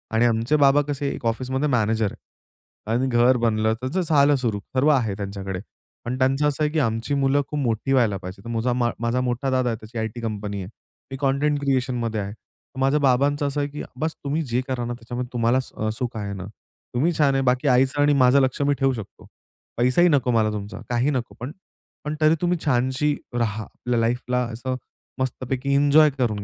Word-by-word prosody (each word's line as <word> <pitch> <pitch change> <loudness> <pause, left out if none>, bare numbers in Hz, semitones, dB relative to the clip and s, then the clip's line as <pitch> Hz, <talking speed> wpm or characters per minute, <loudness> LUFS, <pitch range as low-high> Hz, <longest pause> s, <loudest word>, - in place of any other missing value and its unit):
आणि 115 +2 +4
आमचे 115 +4 +2
बाबा 145 -1 +5
कसे 145 -1 -2
एक - - -8
ऑफिसमध्ये 130 +5 -1
मॅनेजर 110 -4 +1
आहे 110 - -11
आणि 130 +2 +1
घर 125 +1 +4
बनलं 110 -2 +1
त्याचं 130 +9 -1
झालं 145 -4 +4
सुरू 115 -6 -1 0.2
सर्व 135 +4 +4
आहे 125 -8 +2
त्यांच्याकडे, 100 -2 -5 0.5
पण 125 +2 -2
त्यांचं 135 +3 +2
असं 150 +1 0
आहे 150 - +1
की 160 - 0
आमची 115 0 -1
मुलं 140 0 +2
खूप 150 - -3
मोठी 125 0 0
व्हायला 115 -7 +3
पाहिजे. 95 +5 -9
माझा 115 +2 0
मा 120 -1 +1
माझा 120 +2 0
मोठा 125 +2 -1
दादा 130 -1 +1
आहे 115 - -1
त्याची 110 +2 -9
आयटी 110 +1 -3
कंपनी 105 -3 -4
आहे. 90 - -9 0.4
मी 135 - -4
कंटेंट 145 +2 +1
क्रिएशनमध्ये 125 -5 0
आहे. 100 +1 -5 0.5
माझ्या 135 +3 +3
बाबांचं 140 +2 +2
असं 140 +1 -2
आहे 145 - -2
की 145 +1 -6 0.2
बस 160 +1 -1
तुम्ही 145 +3 -1
जे 125 +2 +2
करा 125 -2 -2
ना 120 - -3
त्याच्यामध्ये 120 +1 -5
अ, - - -32
तुम्हाला 120 +1 +2
स 130 - -6
अ, 110 - -2
सुख 120 -2 -3
आहे 100 -2 -4
ना? 95 -1 -6 0.5
तुम्ही 150 +8 +1
छान 145 -3 +4
आहे, 135 - +2
बाकी 130 +3 +1
आईचं 130 +2 +3
आणि 145 0 +4
माझं 130 0 +5
लक्ष 130 +1 0
मी 145 0 +3
ठेवू 135 -1 +2
शकतो. 110 -5 -9 0.5
पैसाही 125 +9 +4
नको 135 -5 +2
मला 110 -2 +3
तुमचा 105 +1 -6
काहीही 125 +4 +1
नको 125 -4 -3
पण 125 +4 -5 0.5
पण 150 +1 -2
तरी 155 +1 +5
तुम्ही 175 0 +1
छानशी 130 +2 +1 0.2
राहा. 110 -3 -1
आपल्या 120 +2 -3
लाईफला 125 +2 0 0.2
असं 130 +3 -3 0.4
मस्तपैकी 130 +1 -2
एन्जॉय 145 +2 +6
करून 110 -6 0
125 Hz, 200 wpm, -23 LUFS, 115-140 Hz, 0.5 s, एन्जॉय